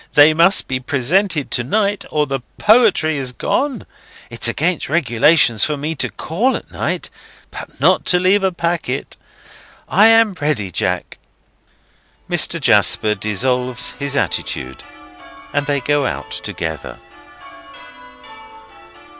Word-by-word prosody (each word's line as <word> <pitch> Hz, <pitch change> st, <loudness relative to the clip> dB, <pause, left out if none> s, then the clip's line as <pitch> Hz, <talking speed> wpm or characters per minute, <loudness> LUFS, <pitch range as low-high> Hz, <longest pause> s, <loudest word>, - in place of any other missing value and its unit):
They 150 Hz, +2 st, +6 dB
must 170 Hz, +5 st, +3 dB
be 130 Hz, -1 st, -2 dB
presented 150 Hz, +5 st, -1 dB
to 120 Hz, -, +1 dB
night, 205 Hz, -, -1 dB
or 150 Hz, -1 st, 0 dB
the 135 Hz, -1 st, -3 dB, 0.2 s
poetry 210 Hz, -, +3 dB
is 130 Hz, -2 st, -4 dB
gone. 280 Hz, -, -2 dB, 0.5 s
It's -, -, -1 dB
against 175 Hz, -5 st, -1 dB
regulations 140 Hz, -4 st, +3 dB
for 150 Hz, -1 st, 0 dB
me 150 Hz, +3 st, -3 dB
to 130 Hz, -5 st, -1 dB
call 180 Hz, -, -2 dB
at -, -, -8 dB
night, -, -, -4 dB, 0.4 s
but -, -, -11 dB
not -, -, +3 dB
to 180 Hz, -, +2 dB
leave 190 Hz, +2 st, +2 dB
a 190 Hz, -, +1 dB
packet. 170 Hz, -6 st, -3 dB, 0.7 s
I 210 Hz, +4 st, +4 dB
am 225 Hz, -2 st, +4 dB
ready, 130 Hz, -11 st, -1 dB
Jack!" 85 Hz, -, -3 dB, 1.1 s
Mr. -, -, +2 dB
Jasper 105 Hz, -1 st, +4 dB
dissolves 125 Hz, +4 st, 0 dB
his 140 Hz, +2 st, -2 dB
attitude, 65 Hz, -, -3 dB, 0.7 s
and 145 Hz, 0 st, -1 dB
they 145 Hz, -1 st, 0 dB
go 145 Hz, +1 st, 0 dB
out -, -, -6 dB
together. 80 Hz, -3 st, -6 dB
145 Hz, 125 wpm, -17 LUFS, 125-180 Hz, 1.1 s, They